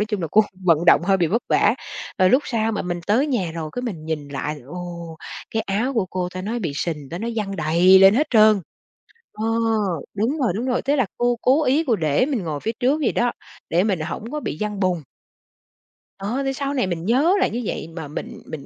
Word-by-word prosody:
Nói - - +2
chung 210 -4 -3
là 165 - -2
cô 215 - +6 0.2
vận 170 -2 +3
động - - +6
hơi 195 +2 +3
bị 175 -3 +2
vất 225 +9 0
vả, - - +3 0.4
rồi 185 -1 +5
lúc 265 +3 +4
sau 225 -2 0
mà 210 - -2
mình 175 -1 -3
tới 240 +8 +3
nhà 225 - -1
rồi 160 -2 -5
cái 245 - -4
mình 190 -11 -5
nhìn 150 -3 -3
lại, 145 +2 -4
ồ, 170 0 -7 0.3
cái 220 - -1
áo 215 +7 0
của 220 -5 +1
cô 180 -1 -2
ta 185 - -4
nói 225 +5 -2
bị 170 -10 -3
sình, 150 -2 -3
ta 170 - -5
nói 230 +4 -3
văng 195 -3 -2
đầy 175 +4 +5
lên 195 +1 +7
hết 295 +6 +2
trơn. 215 -3 +6 0.7
Ờ, 215 - -4 0.7
đúng 225 +9 0
rồi, 245 -9 +1
đúng 230 +4 -2
rồi, 255 -1 0
thế 285 +2 +1
là 265 -5 +2
cô 240 0 +2
cố 280 +5 +3
ý 290 +4 +2
cô 235 - +3
để 155 - +1
mình 260 -8 -2
ngồi 155 -3 -3
phía 220 - -2
trước 265 +5 +2
vậy 270 - +2
đó, 240 0 +1 0.4
để 175 +2 +3
mình 195 -5 0
hổng 170 +9 -5
có 300 - -2
bị 155 - -4
văng 210 -1 -2
bùn. 185 -3 +1 1.2
Ờ, 220 +8 -2
thì 270 - 0
sau 275 +1 -3
này 255 -9 0
mình 170 -2 -3
nhớ 270 - +3
là - - +3
như 240 - -3
vậy - - -4
mà 160 -4 -5
mình 150 - -7
mình 150 -3 -8
200 Hz, 240 wpm, -22 LUFS, 170-245 Hz, 1.2 s, lên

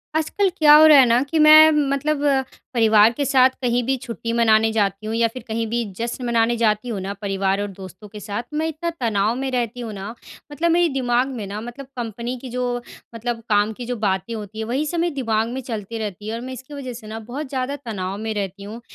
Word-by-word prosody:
आजकल 375 +5 +1
क्या 300 -1 +7
हो 310 - +8
रहा 300 -2 +8
है 260 - +7
ना 235 +1 +3
कि 325 - 0
मैं 310 +1 +9
मतलब 295 0 0 0.5
परिवार 220 -2 +5
के 285 - -2
साथ 265 -2 +5
कहीं 245 0 +1
भी 265 +3 0
छुट्टी 230 -1 -5
मनाने 225 -1 +3
जाती 200 -1 -1
हूँ 220 - -2
या 230 0 +3
फ़िर 240 +2 -9
कहीं 225 0 -2
भी 235 +2 -1
जश्न 235 +2 -4
मनाने 235 0 +2
जाती 220 +1 +1
हूँ 215 -4 -3
ना 195 +1 -4
परिवार 195 -1 0
और 205 - -2
दोस्तों 190 0 -11
के 210 +1 -10
साथ, 205 +3 -4
मैं 315 +1 0
इतना 320 +2 -3
तनाव 220 -2 +1
में 270 +1 -3
रहती 245 -1 -2
हूँ 230 -3 -5
ना 195 +1 -6 0.4
मतलब 330 +4 0
मेरे 345 0 +3
दिमाग 250 -1 +1
में 215 - -5
ना 205 +2 -5
मतलब 240 +4 -8
कंपनी 235 +1 -4
की 255 - -8
जो 245 0 -2 0.3
मतलब 235 +1 -3
काम 210 0 +3
की 240 +2 -8
जो 245 - -3
बातें 200 0 -1
होती 215 -1 -7
हैं 220 - -2
वही 265 +7 -1
सब 340 +2 -2
मेरे 340 -1 0
दिमाग 225 -4 0
में 260 +2 -4
चलती 230 -3 -6
रहती 210 -1 -6
है 220 - -3
और 230 - -6
मैं 260 +1 -6
इसकी 260 +3 -10
वजह 265 -3 -6
से 225 -2 -11
ना 220 +1 -6
बहुत 255 +6 -7
ज़्यादा 260 +1 -2
तनाव 200 -8 -5
में 220 +1 -3
रहती 200 -1 -4
हूँ। 220 +4 -8
235 Hz, 235 wpm, -21 LUFS, 215-260 Hz, 0.5 s, मैं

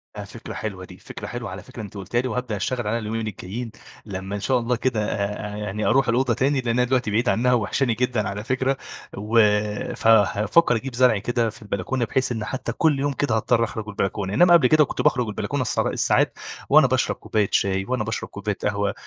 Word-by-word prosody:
آآ، - - -5
فكرة - - -9
حلوة 95 -4 -5
دي - - -13
فكرة - - -9
حلوة - - -5
على - - -8
فكرة - - -9
أنتِ 105 -1 -9
قلتيها 100 +5 -1
لي، 130 - -3
وهابدأ 125 -2 -3
أشتغل 120 +3 -2
عليها 115 +2 0
اليومين 110 0 -3
الجايين 110 +4 -6 0.3
لما 95 -1 -5
إن - - -3
شاء 125 +5 +1
الله 120 +1 0
كده 115 -3 -1
آآ، 105 +1 -3
يعني 105 0 -3
أروح 135 -1 +3
الأوضة 125 +1 +2
تاني 135 +3 +1
لأن 120 - -3
أنا - - +4
دلوقتي 125 -3 0
بعيد 115 +4 +1
عنها 125 +2 +2
وواحشاني 120 +2 +1
جدًا 120 -2 0
على 105 +1 -5
فكرة، 130 +3 0 0.4
و 105 +3 +1 0.6
فهافكر 110 - +4
أجيب 120 +2 -4
زرع 125 -3 +4
كده 115 +2 0
في 110 - -13
البلكونة 105 +4 -2
بحيث 130 +3 0
إن 110 -3 -3
حتى 130 - -4
كل 155 -4 +2
يوم 145 +1 0
كده 135 -4 0
هاضطر 115 +1 +2
أخرج 110 -1 -4
البلكونة، 95 -1 -2
إنما 175 +9 +6
قبل 165 -7 +6
كده 155 +2 +5
كنت - - -4
باخرج 125 -3 +2
البلكونة 130 +6 -2
الس 120 - -1
الساعات - - +2 0.4
وأنا - - +7
باشرب - - +1
كوباية 105 -2 -1
شاي 95 0 +1
وأنا 125 -1 -1
باشرب 110 +1 -4
كوباية 100 0 -4
قهوة، 100 -1 0
115 Hz, 210 wpm, -23 LUFS, 105-125 Hz, 0.6 s, وأنا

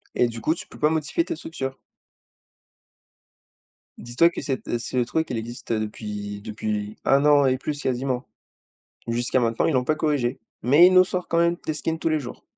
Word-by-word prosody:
Et 125 - +3
du 115 -1 -7
coup, 160 +7 +1
tu - - -8
peux - - -14
pas 150 - +4
modifier 160 - 0
ta 335 - -3
structure. 135 - -6 2.2
Dis 120 +1 -10
toi 170 +6 +6
que - - -6
cette, 135 -4 -3
heu, 120 - -1
ce 120 - -6
le 125 - +3
truc 160 +5 -1
elle 120 - -1
existe 115 +1 -5
depuis 105 -1 -4
depuis 105 0 -4
1 140 +2 +4
an 145 -1 +6
et 130 -1 +2
plus 145 +2 -4
quasiment. 130 0 -1 0.8
Jusqu'à 120 +2 +1
maintenant 115 -2 +1
ils 160 - +1
l'ont 125 - +2
pas 155 +4 +1
corrigé 145 -6 0 0.2
mais 145 +9 +7
ils 185 - +3
nous 185 - +8
sort 180 -1 -3
quand 165 - 0
même 170 0 +3
des 155 - -1
skins 160 +1 -3
tous - - 0
les 155 -1 +1
jours. 125 -3 -9
130 Hz, 205 wpm, -24 LUFS, 120-155 Hz, 2.2 s, nous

